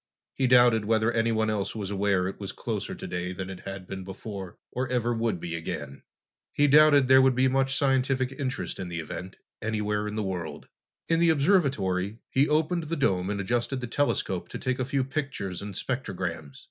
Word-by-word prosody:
He 130 - +1
doubted 120 -3 +5
whether 110 +1 +2
anyone 115 -1 +1
else 105 -1 -2
was 100 -3 -4
aware 100 -2 +1
it 95 - -6
was 100 -2 -5
closer - - -4
today 90 +1 -4
than 95 +1 -5
it 95 - -8
had 95 -1 -7
been 95 +1 -6
before, 95 -1 -7
or 130 +1 -2
ever 120 -1 +1
would 115 -5 -1
be 85 0 -4
again. 80 -4 -5 0.5
He 145 - +3
doubted 145 -1 +6
there 130 0 +7
would 130 -1 +4
be 130 +1 +4
much 135 +1 +1
scientific 130 -2 +1
interest 135 -2 -4
in 95 - -4
the 85 -1 -4
event, 85 +4 -7 0.2
anywhere 105 -1 -1
in 105 - -4
the 110 - -1
world. 90 -4 -5 0.4
In 165 0 +2
the 170 0 +4
observatory, 135 - +2
he 140 +3 +3
opened 160 +2 +1
the 165 +2 -2
dome 95 - +1
and 105 -1 -2
adjusted 120 +6 -1
the 125 - -4
telescope 95 -9 -1
to - - -5
take 130 0 -2
a 130 - 0
few 135 +1 0
pictures 135 - -4
and 100 -1 -7
spectrograms. 90 - -4
110 Hz, 195 wpm, -27 LUFS, 95-130 Hz, 0.5 s, there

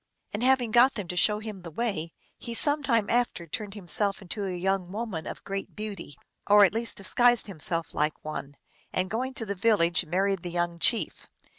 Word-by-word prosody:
And 205 - -3
having 250 -2 +3
got 245 +4 +5
them 205 -5 -5
to 180 - -4
show 210 +3 +4
him 215 -3 -7
the 175 - -8
way, 165 -3 -2 0.3
he 235 - -6
some 290 +4 +4
time 230 -7 +1
after 240 -7 0
turned 200 +6 -5
himself 200 +1 +1
into 200 +1 -5
a - - -3
young 185 0 -1
woman 205 -6 -4
of - - -7
great 195 0 -5
beauty, 205 -9 -7 0.3
or 205 0 +7
at 195 - 0
least 230 0 -1
disguised 240 +5 +3
himself 165 -3 -3
like 150 +1 -1
one, 145 -2 -6 0.3
and 185 +1 -1
going 255 +4 -2
to 225 - -2
the 200 - -3
village 185 -5 +3
married 195 +3 +1
the 175 - -4
young 175 0 -2
chief. 230 +6 0
200 Hz, 195 wpm, -27 LUFS, 175-230 Hz, 0.3 s, or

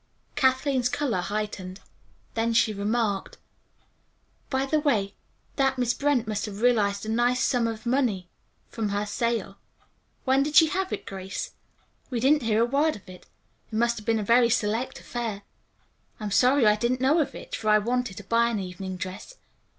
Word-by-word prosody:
Kathleen's 260 -2 +2
color 285 -9 -1
heightened. 200 -1 -4 0.5
Then 230 0 0
she 220 -2 +3
remarked: 205 0 -1 1.1
"By 265 -1 0
the 305 +3 +1
way, 225 -10 +1 0.4
that 270 -1 +2
Miss 245 -1 +1
Brent 280 -5 +1
must 215 0 -2
have 210 +2 -7
realized 205 -4 +2
a - - -7
nice 240 +2 +2
sum 245 -3 +2
of 225 0 -5
money 235 -8 0 0.4
from 220 -3 -3
her 205 +1 -1
sale. 210 -2 -2 0.7
When 265 +1 +3
did 295 +2 -2
she 320 -2 +7
have 380 +2 -2
it, - - -4
Grace? 195 - -5 0.6
We 245 - -2
didn't 285 +5 +4
hear 225 -1 +2
a - - +3
word 285 +5 +1
of 205 - -14
it. 185 -1 -13 0.4
It - - -5
must 235 +1 +1
have 210 - -14
been 225 -1 +3
a 215 - -1
very 235 +3 +4
select 225 +1 -1
affair. 225 -4 -5 0.8
I'm 210 -2 -4
sorry 250 +4 +4
I 210 0 +5
didn't 245 +3 0
know 275 +6 +3
of 305 - -1
it, - - -7
for 215 - -2
I 215 - +6
wanted 240 -1 -1
to 205 - -7
buy 235 +3 +2
an 230 - -1
evening 185 0 -6
dress. 190 - -7
230 Hz, 180 wpm, -26 LUFS, 205-260 Hz, 1.1 s, she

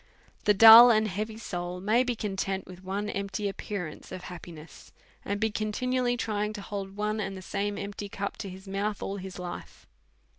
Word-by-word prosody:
The 210 - +5
dull 225 +3 +11
and 215 -2 +3
heavy 215 +3 -4
soul 180 -4 -5
may 215 +6 +3
be 250 -1 -2
content 195 -2 -3
with 185 0 -12
one 195 +2 -3
empty 200 0 -3
appearance 195 -4 -6
of 185 -1 -7
happiness, 170 -3 -11 0.3
and 200 +1 -2
be 220 0 +1
continually 245 +4 -1
trying 210 -2 -2
to 210 - -7
hold 195 -1 -6
one 210 +1 -1
and 195 -2 -3
the - - -8
same 205 +2 -2
empty 200 0 -6
cup 200 0 -4
to 195 - -6
his 190 +2 -11
mouth 200 +2 -2
all 195 - -3
his 190 -1 -8
life. 180 -1 -8
200 Hz, 185 wpm, -28 LUFS, 190-215 Hz, 0.3 s, dull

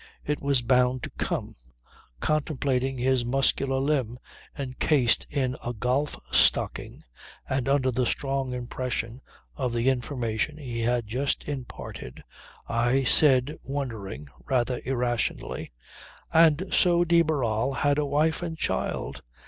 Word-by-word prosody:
It 150 0 -1
was 140 -3 +1
bound 125 0 +2
to - - -5
come. - - -3 0.7
Contemplating 135 -3 0
his 130 0 +2
muscular 135 +1 +1
limb 135 -4 0 0.4
encased 130 -1 +1
in 130 -3 -1
a 120 - -3
golf 125 +6 -1
stocking, - - +2 0.4
and 130 0 -1
under 135 -2 +2
the 125 0 0
strong 135 -2 -1
impression 125 -1 -4 0.3
of 130 -4 -2
the 120 +2 +2
information 125 +1 -2
he 125 -6 -5
had 120 0 +1
just 130 +6 -1
imparted 125 - -7 0.4
I 120 +4 +2
said 135 +2 +4
wondering, 110 - -5 0.2
rather 125 0 0
irrationally: 120 - -2 0.6
"And 165 +1 +5
so 175 -1 +4
de 170 0 +4
Barral 130 -6 0
had 145 +2 +1
a 150 - +1
wife 155 +4 +1
and 165 -2 -4
child! - - -2
130 Hz, 125 wpm, -26 LUFS, 120-145 Hz, 0.7 s, And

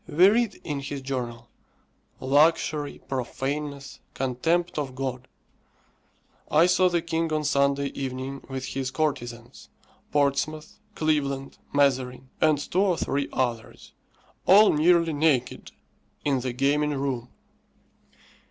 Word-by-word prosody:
We 175 +5 +6
read 225 -1 +1
in 145 -3 -3
his 140 0 -6
journal, 120 -3 -4 0.7
"Luxury, 150 +1 +2
profaneness, 140 +2 -4 0.2
contempt 160 +7 0
of 135 -3 -4
God. 130 -1 -4 1.2
I 155 +3 +5
saw 185 0 +4
the 170 -2 0
king 165 -1 -1
on 155 0 0
Sunday 140 -1 +1
evening 135 0 -5
with 135 0 -4
his 135 -1 -3
courtesans, 120 -4 -4 0.4
Portsmouth, 145 +2 -1 0.2
Cleveland, 140 -3 -1
Mazarin, 130 -2 +1
and 155 -1 +4
two 170 +6 -1
or 190 -4 +2
three 140 +1 -1
others, 120 -3 -3 0.5
all 205 +3 +7
nearly 165 +1 +3
naked, 145 -4 0 0.5
in 140 -3 +2
the 125 0 -3
gaming 145 +3 +1
room." 135 -3 -3
140 Hz, 115 wpm, -26 LUFS, 130-155 Hz, 1.2 s, all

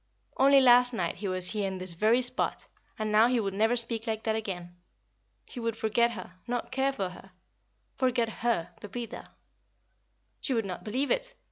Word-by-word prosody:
Only 275 +1 +6
last 245 0 +6
night 175 -7 -2
he 200 +2 -4
was 185 -1 +3
here 210 -2 -1
in 190 -1 -4
this 185 -1 -5
very 220 +8 +3
spot, 250 +2 0 0.3
and 215 -1 -2
now 215 +2 +6
he 245 -1 +1
would 200 -3 -2
never 220 +4 +2
speak 230 -1 0
like 220 -1 -2
that 220 -1 0
again. 175 -5 -5 0.7
He 250 - -8
would 230 -1 -2
forget 225 +2 +2
her, 185 -3 -10
not 245 0 -3
care 270 +1 +1
for 195 -8 -3
her 180 +2 -13 0.7
forget 245 -3 +1
her, 230 -9 0
Pepita. 235 +3 -7 1.1
She 265 - -1
would 225 -2 0
not 180 -2 -6
believe 255 +7 -1
it. - - -1
225 Hz, 180 wpm, -28 LUFS, 195-245 Hz, 1.1 s, Only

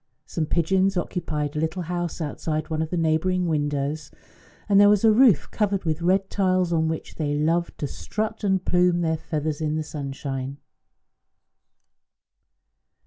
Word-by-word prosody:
Some 160 -2 -3
pigeons 190 +4 +2
occupied 155 -4 -2
a - - -1
little 160 +3 -2
house 175 0 -3
outside 155 +1 -3
one 160 0 0
of 160 - -2
the 180 - -2
neighbouring 165 +3 +1
windows, 145 -1 -1 0.6
and 200 -1 +5
there 205 - +7
was 210 +1 +3
a 220 - +7
roof 220 - +4
covered 200 -3 0
with 160 -1 -1
red 190 +3 +2
tiles 185 -3 +1
on 160 -1 +2
which 160 0 -5
they 145 -2 -1
loved 165 +3 0
to - - -3
strut 215 +8 -4
and 190 -2 +1
plume 180 -1 +3
their 160 -1 +1
feathers 155 -1 -3
in 155 0 0
the 155 - -1
sunshine. 140 -2 -5
165 Hz, 155 wpm, -24 LUFS, 155-185 Hz, 0.6 s, there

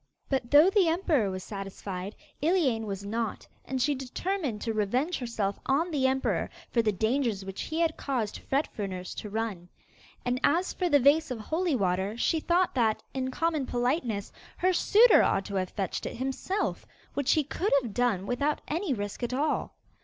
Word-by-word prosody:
But 265 -3 -1
though 300 +7 +7
the 390 -4 +4
emperor 320 - +2
was 185 -1 -5
satisfied, 195 -1 -6 0.3
Iliane 285 - +2
was 200 0 -5
not, 225 +1 -3 0.2
and 260 0 -2
she 290 +3 +2
determined 270 - -3
to 225 - -1
revenge 245 - 0
herself 220 -5 -2
on 315 +6 +2
the 270 -4 +2
emperor 265 0 0 0.2
for 235 - +3
the 220 -2 +2
dangers 220 0 0
which 195 0 -5
he 315 - -3
had 325 -2 +1
caused 240 -7 -2
Fet 275 +3 0
Fruners 185 -3 -4
to 210 - -5
run. 205 -5 -3 0.6
And 250 +1 0
as 345 +5 +2
for 360 -2 -1
the 290 -2 +5
vase 285 +4 +4
of 250 - -3
holy 320 - -1
water, 190 0 0
she 320 +6 +1
thought 350 +3 +2
that, 225 -4 +1
in 260 -1 -2
common 310 0 -1
politeness, 245 -4 -1 0.3
her 370 +1 +2
suitor 435 +6 +6
ought 195 - +1
to 200 - -5
have 185 -1 -1
fetched 195 -4 -3
it - - -6
himself, 270 - -2 0.3
which 285 -2 +2
he 310 - +2
could 355 +8 -2
have 230 -4 -6
done 235 -6 +1
without 280 +6 0
any 325 -2 -1
risk 205 +1 -5
at 245 +1 -1
all. 295 +3 -1
255 Hz, 185 wpm, -28 LUFS, 210-310 Hz, 0.6 s, though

